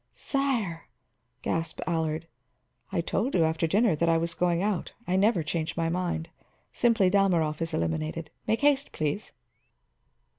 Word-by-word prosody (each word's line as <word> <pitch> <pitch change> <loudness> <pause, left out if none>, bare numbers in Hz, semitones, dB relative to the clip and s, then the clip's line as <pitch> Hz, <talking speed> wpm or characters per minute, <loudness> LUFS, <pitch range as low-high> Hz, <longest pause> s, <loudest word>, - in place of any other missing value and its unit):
"Sire!" 240 - -1 0.6
gasped 165 -1 -1
Allard. 160 -2 -1 0.7
"I 185 -3 +1
told 215 +8 -1
you 170 - +4
after 160 +1 +1
dinner 205 +1 +3
that 170 +2 +1
I 165 - +4
was 165 +1 -1
going 175 +1 +1
out; 205 -3 -1
I 185 - 0
never 195 -3 +3
change 165 +1 -2
my 165 -1 +1
mind. 170 -2 -2 0.4
Simply, 230 -5 +3
Dalmorov 175 -6 +2
is 165 - -1
eliminated. 80 - -2 0.2
Make 220 +3 +1
haste, 285 -1 +3
please." 155 +7 -2
170 Hz, 145 wpm, -28 LUFS, 160-200 Hz, 0.7 s, you